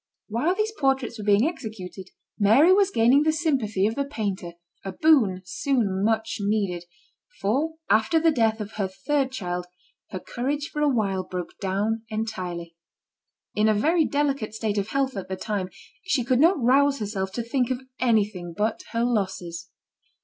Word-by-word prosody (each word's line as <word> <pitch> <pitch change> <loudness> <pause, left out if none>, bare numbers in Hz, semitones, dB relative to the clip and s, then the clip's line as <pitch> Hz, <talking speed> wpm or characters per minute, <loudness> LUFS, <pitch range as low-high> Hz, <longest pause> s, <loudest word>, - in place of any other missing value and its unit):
While 255 - +1
these 430 +2 0
portraits 270 - 0
were - - -5
being 210 +6 +4
executed 210 - -7 0.3
Mary 245 - +6
was 400 0 +4
gaining 245 -1 +4
the 315 +1 +3
sympathy 260 - 0
of 220 - +1
the 280 - -1
painter, 200 -10 -4 0.3
a 195 - -5
boon 220 -13 +3
soon 200 -3 0
much 220 +1 0
needed, 200 -4 -1 0.5
for 285 +11 0
after 220 +10 +3
the 325 0 +4
death 225 -5 +1
of 210 0 -5
her 200 -3 0
third 270 +8 -1
child 180 -7 -4 0.4
her 185 - -5
courage 285 +9 -3
for 300 - -2
a 295 - +4
while 200 -7 0
broke 180 -1 -6
down 205 +4 -1
entirely. 180 -6 -4 0.8
In 210 +1 +2
a 215 - +3
very 320 +10 +3
delicate 280 -7 -1
state 215 -2 -1
of 200 - -2
health 270 -2 0
at 195 - -5
the 190 - -2
time, 200 -2 -3 0.3
she 295 -9 0
could 255 +1 +2
not 335 +3 +5
rouse 275 +3 +4
herself 200 -4 -3
to 235 - -2
think 245 +1 0
of 255 0 -2 0.2
anything 205 -8 0
but 215 +1 0
her 230 +1 +1
losses. 185 -7 -2
220 Hz, 170 wpm, -25 LUFS, 195-275 Hz, 0.8 s, Mary